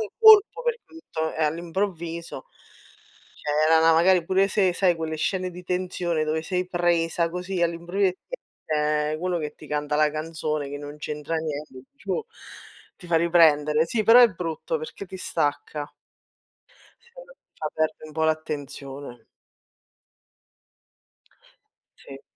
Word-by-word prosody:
un 215 - -3
colpo 440 +1 +7
perché 475 -1 -1
tutto, 160 - -5
eh, 160 - 0
all'improvviso! 170 -1 -3 1.0
Cioè 150 - -2 0.2
era 160 0 +5
'na 165 0 +5
magari 175 +1 +4
pure 190 +2 +3
se 190 -2 +2
sai 180 -1 +2
quelle 160 -1 -4
scene 185 +3 -1
di 180 0 -11
tensione 180 -3 -1
dove 155 +1 -1
sei 180 +1 -2
presa 170 -1 +1
così 180 +1 -4
all'improvvi 170 +4 -1
e 185 - +1 0.2
ti - - -5 0.4
esce 150 0 0
quello 180 0 -1
che 150 -1 -5
ti 155 - -13
canta 150 0 -2
la 150 0 +3
canzone 155 -2 -3
che 145 +1 -6
non 145 0 -8
c'entra 150 +1 -5
niente, 150 -4 -5
dici: 280 - -20
"Oh!" 460 - -1 0.7
Ti 180 -3 -14
fa 165 - +3
riprendere. 160 -2 +4
Sì, 215 +5 -1
però 230 +4 +8
è 240 - +8
brutto 180 - -4
perché 465 - -8
ti 190 0 -9
stacca. 145 -3 -2 1.1
Se 475 - -24 0.2
lo - - -17 0.2
fa 155 - -3
perde 155 0 -1
un 155 - -12
po' 160 - -2
l'attenzione. 140 -5 -4 2.7
Sì. 135 0 -12
165 Hz, 150 wpm, -25 LUFS, 150-185 Hz, 2.7 s, però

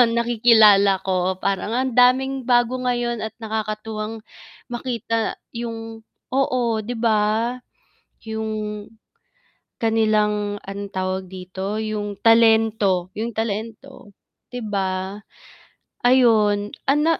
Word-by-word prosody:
nakikilala 220 -4 +5
ko 185 -1 0
parang 200 +3 -1
ang 260 +1 0
daming 260 +1 +3
bago 240 0 +3
ngayon 240 -1 -1
at 220 0 -5
nakakatuwang 215 0 -4 0.5
makita 235 -2 -2 0.2
yung 225 -1 -6 0.3
oo, 250 -4 +1
'di 240 +3 -5
ba? 225 +1 +1 0.7
Yung 215 -1 -4 1.0
kanilang, 210 -2 +1
anong 200 0 -7
tawag 185 0 -2
dito, 190 +3 -5
yung 210 -2 -4
talento 220 -5 +4
yung 230 +2 -3
talento 225 +2 -5 0.4
'di 245 - -4
ba, 190 -1 -2 0.9
ayun 220 -5 +3 0.2
ana 300 +4 +3
220 Hz, 95 wpm, -22 LUFS, 205-235 Hz, 1.0 s, nakikilala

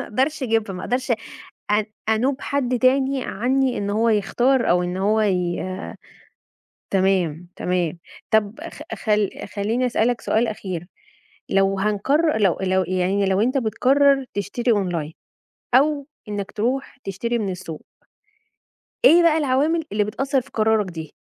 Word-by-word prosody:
ما - - -4
أقدرش 270 +7 -1
أجيبها 225 -4 0
ما 180 - -6
أقدرش 255 +2 -2 0.6
أن 210 0 +2 0.2
أنوب 255 +5 +1
حد 255 -3 -1
تاني 265 +1 +2
عنّي 255 +3 0
إن 200 0 -2
هو 220 +3 +2
يختار 240 +5 +2
أو 180 +1 +3
إن 180 +1 -3
هو 210 +3 +2
ي 180 -4 0 1.3
تمام، 185 -4 +1
تمام 180 -2 -1 0.3
طب 220 +1 +1
خ - - -12
خل 210 -2 +1 0.3
خلّيني 220 +5 0
أسألك 240 -1 +1
سؤال 230 +2 +1
أخير، 185 -5 -5 0.6
لو 195 0 +2
هنقرر 245 +10 +1
لو 195 -6 +2
لو 190 0 +2
يعني 185 +2 0
لو 190 +1 +2
أنت 255 +5 +1
بتقرر 270 +4 +3
تشتري 235 +5 -1
أونلاين 175 -7 -1 0.6
أو 285 +1 +3 0.2
إنّك 200 -1 -4
تروح 250 +6 -2
تشتري 235 +5 -2
من 205 -4 -2
السوق، 175 -4 -7 1.2
إيه 345 -3 +7
بقى 325 -2 +4
العوامل 300 +3 +1
اللي 210 0 +2
بتأثر 270 +6 -1
في - - -14
قرارك 220 -2 +2
دي؟ 160 -4 -8
215 Hz, 140 wpm, -22 LUFS, 195-260 Hz, 1.3 s, إيه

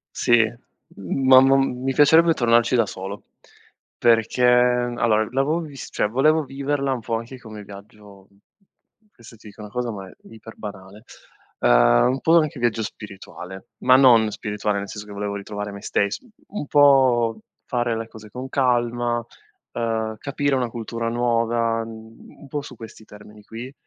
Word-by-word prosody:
Sì, 120 -1 +4 0.5
ma 130 +7 +4
m 135 -2 +2
mi 135 0 0
piacerebbe 160 +4 +5
tornarci 120 -2 +2
da 115 -2 +3
solo 95 +1 -8 0.7
perché 115 +1 +2
allora 120 -2 +2
l'avevo 135 +5 0
vis 145 -6 -9
cioè - - 0
volevo 155 +8 +2
viverla 140 0 -2
un 130 - -4
po' 115 +1 -3
anche 115 +3 -6
come 110 -3 -10
viaggio 100 -1 -14 0.9
questo 115 0 -15
ti 110 - -16
dico 105 +1 -13
una 105 -1 -10
cosa 125 0 -3
ma 100 -3 -8
è - - -13
iper-banale, 105 -2 -11 0.6
ehm, - - +4
un 130 +1 -1
po' 165 +1 +4
anche 155 -3 -2
viaggio 115 -2 0
spirituale, 95 -2 -10
ma 130 0 +5
non 120 -5 +6
spirituale 105 0 -3
nel 100 - -6
senso 105 -1 -8
che 105 - -10
volevo 100 0 -4
ritrovare 105 +1 -6
me 100 0 -9
stess 100 +1 -1
u 250 - -22 0.3
un 145 - -6
po' 130 -6 +4 0.3
fare 120 -2 -1
le 115 0 -5
cose 110 -1 -13
con 125 +5 -7
calma, 120 -3 0 0.5
uhm, 110 -1 -2
capire 145 0 -2
una 125 -2 -1
cultura 115 0 -4
nuova, 115 -1 0
mhmm, 110 0 -13
un 145 - -13
po' 145 +2 -4
su 140 -2 -11
questi 115 -1 -12
termini 105 0 -15
qui, 120 +5 -9
115 Hz, 160 wpm, -22 LUFS, 105-130 Hz, 0.9 s, non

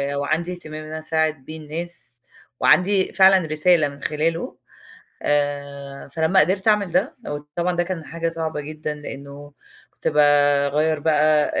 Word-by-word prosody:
وعندي 160 +5 -1
اهتمام 155 -3 -8
إن 155 0 -9
أساعد 155 -3 -1
بيه 160 0 -8
الناس، 155 -5 -4 0.4
وعندي 190 +1 +3
فعلًا 190 -3 +5
رسالة 155 0 +3
من 140 0 -11
خلاله. 160 +2 -1 0.7
آآ، 140 -1 -2
فلمّا 160 +6 +2
قدرت 190 +6 +1
أعمل 205 -4 +3
ده، 190 - 0
وطبعًا 150 +5 -3
ده 175 - +2
كان 175 -3 -5
حاجة 165 0 -3
صعبة 160 -2 -4
جدًا، 155 0 -5
لأنه 140 0 -10 0.4
كنت - - -6
باغيِّر 145 +1 +3
بقى 150 0 +3
155 Hz, 135 wpm, -22 LUFS, 145-170 Hz, 0.7 s, فعلًا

